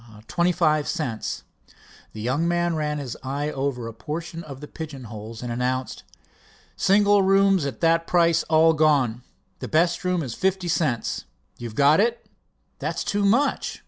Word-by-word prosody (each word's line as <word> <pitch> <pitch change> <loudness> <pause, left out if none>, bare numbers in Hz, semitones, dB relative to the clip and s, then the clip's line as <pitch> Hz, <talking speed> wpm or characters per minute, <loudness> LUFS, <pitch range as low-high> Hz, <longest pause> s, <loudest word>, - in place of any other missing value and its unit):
"Twenty 175 +1 +1
five 155 -4 +1
cents." 125 -11 -3 0.7
The 110 - -7
young 135 +9 0
man 175 -1 +1
ran 150 -1 -1
his 135 -5 -5
eye 140 +3 -3
over 135 -4 -3
a 115 - -7
portion 165 +9 -6
of 140 -4 -9
the 150 - -9
pigeon 150 -5 -8
holes 110 +1 -8
and 120 - -4
announced: 125 +2 -2 0.7
"Single 205 +1 +4
rooms 195 -4 +3
at 125 -6 -7
that 165 0 +2
price 170 -2 +3
all 160 0 +5
gone." 150 -6 +3
"And 120 +2 -13 0.4
the - - -5
best 170 +3 +1
room 180 -2 0
is 125 -5 -5
fifty 190 +2 -1
cents?" 150 -7 -1 0.3
"You've 115 -2 -7
got 145 +5 +5
it." 235 +3 +1 0.5
"That's - - -2
too 205 0 -1
much." 235 +9 +1
155 Hz, 165 wpm, -24 LUFS, 130-175 Hz, 0.7 s, all